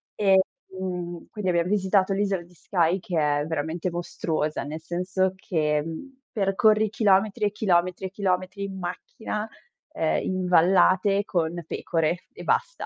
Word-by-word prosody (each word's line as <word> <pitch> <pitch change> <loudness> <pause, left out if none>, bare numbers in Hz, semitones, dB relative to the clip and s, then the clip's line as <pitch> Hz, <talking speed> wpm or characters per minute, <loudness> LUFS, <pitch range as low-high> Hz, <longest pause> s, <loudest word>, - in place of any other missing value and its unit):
Ehm, 185 -3 -1
quindi 210 -4 -2
abbiam 170 0 +1
visitato 195 -1 +2
l'isola 195 -2 0
di 175 +1 -20
Skye, 175 +1 +1
che 175 -1 -4
è 145 -1 +1
veramente 160 +3 -2
mostruosa, 160 -3 -2
nel 155 +3 -6
senso 185 +2 -1
che 150 -5 0 0.5
percorri 215 +1 +3
chilometri 210 +1 +2
e 205 - +1
chilometri 185 -3 +1
e 185 - -12
chilometri 195 0 -1
in 190 -1 -6
macchina, 210 +4 -5 0.5
ehm, 160 - +1
in 185 -1 -1
vallate 185 +3 +4
con 170 -2 -1
pecore 165 +1 -1
e - - -10
basta, 480 +2 0
185 Hz, 135 wpm, -25 LUFS, 170-195 Hz, 0.5 s, vallate